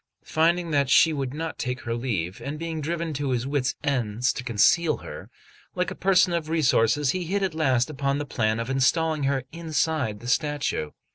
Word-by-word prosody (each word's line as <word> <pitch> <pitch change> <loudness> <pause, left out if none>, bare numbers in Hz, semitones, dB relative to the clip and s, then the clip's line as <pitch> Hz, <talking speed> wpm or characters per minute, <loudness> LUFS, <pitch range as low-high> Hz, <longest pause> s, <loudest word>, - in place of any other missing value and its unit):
Finding 170 +1 +1
that 140 -3 +2
she 160 +3 +5
would 135 -3 -3
not 160 +3 -5
take 125 0 -3
her 115 - -3
leave, 105 -8 -3
and 145 +2 -5
being 165 -1 -4
driven 165 +1 -3
to 145 -1 -2
his 125 -1 -1
wits' 135 -2 -1
ends 125 -3 0
to 125 - -6
conceal 140 - +3
her, - - -9 0.5
like 180 0 -1
a - - -6
person 185 -2 +3
of 165 -2 -2
resources, 140 -3 +2
he 180 +1 -3
hit 195 +4 -1
at 190 -3 -1
last 130 -6 +2
upon 140 -2 -1
the 145 - -3
plan 110 -4 0
of 115 - -3
installing 145 +3 +1
her 135 -1 0
inside 155 -8 -1
the 120 - -9
statue. 145 - 0
145 Hz, 195 wpm, -25 LUFS, 125-160 Hz, 0.5 s, she